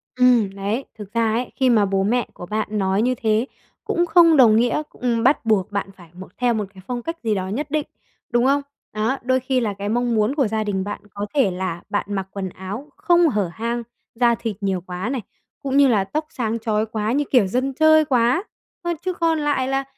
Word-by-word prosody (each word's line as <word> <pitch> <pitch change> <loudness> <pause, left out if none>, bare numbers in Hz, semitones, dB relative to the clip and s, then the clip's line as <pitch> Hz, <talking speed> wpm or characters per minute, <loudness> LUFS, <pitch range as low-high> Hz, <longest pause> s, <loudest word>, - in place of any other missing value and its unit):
Ừm, 250 -5 +4
đấy, 205 +7 -2
thực 210 -2 -10
ra 230 -2 +1
ấy 245 +3 -2
khi 260 -2 +2
mà 220 -4 +4
bố 195 0 0
mẹ 235 +4 +1
của - - -9
bạn 215 +3 -2
nói 195 -1 +1
như 255 +2 +1
thế, 220 +1 +2 0.4
cũng 345 - +1
không 330 -1 +6
đồng 230 -5 +7
nghĩa, 245 +6 +2
ừm, 235 -2 -1
bắt 265 0 +3
buộc 210 -4 +1
bạn 200 -1 -2
phải 175 -3 -15
một 185 +2 -10
theo 245 -1 +2
một 215 -2 -1
cái 190 - -13
phong 245 -1 -3
cách 330 +7 -5
gì 220 -2 +1
đó 185 -1 -2
nhất 275 +9 -4
định, 305 -1 0 0.4
đúng 240 0 +2
không? 280 +2 +3 0.3
Đó, 220 +5 0
đôi 260 +1 +2
khi 260 0 0
là 220 -4 -1
cái 200 +1 -5
mong 240 +1 +1
muốn 215 +5 +1
của 275 -6 +2
gia 220 0 -1
đình 195 -2 -1
bạn 205 +1 -5
có 205 0 -3
thể 265 -9 +3
là 180 -2 -4
bạn 205 - -1
mặc 195 -2 -3
quần 195 -2 -4
áo 195 +10 -7
không 345 -2 +4
hở 205 - 0
hang, 235 +3 -3 0.3
da 235 0 +3
thịt 225 -2 -4
nhiều 190 -2 -1
quá 180 +4 -5
này, 260 -2 -2 0.4
cũng 275 0 0
như 280 -1 +6
là 215 -6 +3
tóc 305 +10 -3
sáng 230 -2 -2
chói 220 -1 0
quá 220 0 -2
như 285 +4 +1
kiểu 245 -7 +4
dân 255 +7 -1
chơi 315 +2 +5
quá 255 +4 +2 0.4
thôi. 345 0 0
Chứ 370 - 0
còn 330 -2 +1
lại 290 -3 0
là 270 0 0
230 Hz, 235 wpm, -22 LUFS, 205-265 Hz, 0.4 s, đồng